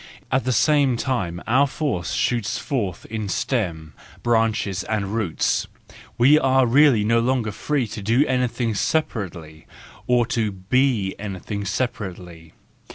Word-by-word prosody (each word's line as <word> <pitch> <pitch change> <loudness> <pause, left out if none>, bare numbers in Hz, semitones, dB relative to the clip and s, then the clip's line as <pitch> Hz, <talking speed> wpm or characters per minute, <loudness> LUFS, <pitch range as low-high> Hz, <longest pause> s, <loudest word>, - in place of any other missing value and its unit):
At 130 0 +1
the 130 - +1
same 140 -2 +3
time 95 -11 -2
our 130 +5 +3
force 120 - -2
shoots 120 -4 0
forth 105 - -3
in 110 -3 -3
stem, 85 - -2 0.3
branches, 110 -5 +1
and 105 -2 -2
roots; 105 -8 0 0.5
we 135 +6 +6
are 130 -1 +3
really 130 -2 +5
no 115 +2 +3
longer 120 -2 0
free 140 +5 -1
to 105 - -6
do 115 +8 +2
anything 125 -3 0
separately, 90 - -3 0.4
or 125 -1 +3
to 115 -3 -1
be 105 +1 +1
anything 100 0 -5
separately. 90 -7 -5
115 Hz, 130 wpm, -22 LUFS, 95-130 Hz, 0.5 s, we